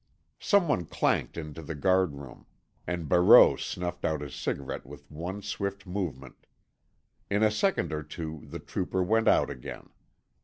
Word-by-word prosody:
Someone 170 - +2
clanked - - 0
into 75 -1 -6
the 80 +1 -6
guard 95 0 +2
room, 70 -2 -11 0.4
and 85 -2 -3
Barreau 90 +5 +7
snuffed 90 0 -5
out 80 -2 0
his 70 -3 -7
cigarette 70 -2 -4
with 70 +2 -13
one 90 +6 -6
swift 100 -1 -4
movement. 90 -9 -5 0.8
In 105 +2 +2
a 110 - +4
second 105 - 0
or 75 - -2
two 80 -1 -7
the - - -7
trooper 95 0 -2
went 110 +4 +2
out - - +4
again. 65 -3 -9
85 Hz, 150 wpm, -28 LUFS, 75-100 Hz, 0.8 s, Barreau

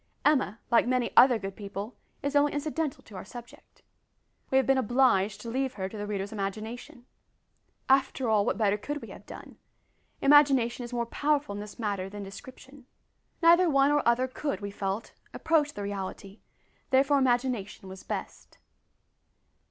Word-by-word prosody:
Emma, 265 -7 +2
like 235 - +4
many 250 -1 0
other 250 -2 +7
good 195 -2 -6
people, 200 +2 -7 0.3
is 285 +1 -2
only 290 0 +4
incidental 300 0 -3
to 210 - -14
our 185 - -6
subject. 240 +3 -13 0.7
We 265 - +3
have 265 - +3
been 270 0 +3
obliged 215 -5 +2
to 230 - -7
leave 265 +1 -2
her 190 -2 -3
to 195 - -10
the 205 0 -5
reader's 200 -1 -3
imagination. 220 +4 -6 0.8
After 265 -1 +2
all, 215 -2 +3
what - - -1
better 210 -2 +2
could 290 +6 -5
we - - -9
have - - -12
done? - - -11 0.6
Imagination 275 -4 +4
is 240 - -8
more 240 -1 -1
powerful 290 -1 0
in 205 - -5
this 210 0 -10
matter 200 -4 -3
than 205 0 -7
description. 260 +6 -12 0.6
Neither 340 +1 +6
one 275 -1 +4
nor 295 0 +3
other 235 +2 +2
could, 260 -4 -4
we 200 -1 -6
felt, 200 +2 -4 0.2
approach 300 -3 +1
the 205 - -5
reality, 200 0 -6 0.5
therefore 275 +2 +4
imagination 245 -6 -1
was 190 0 -9
best. - - -7
240 Hz, 165 wpm, -28 LUFS, 205-275 Hz, 0.8 s, other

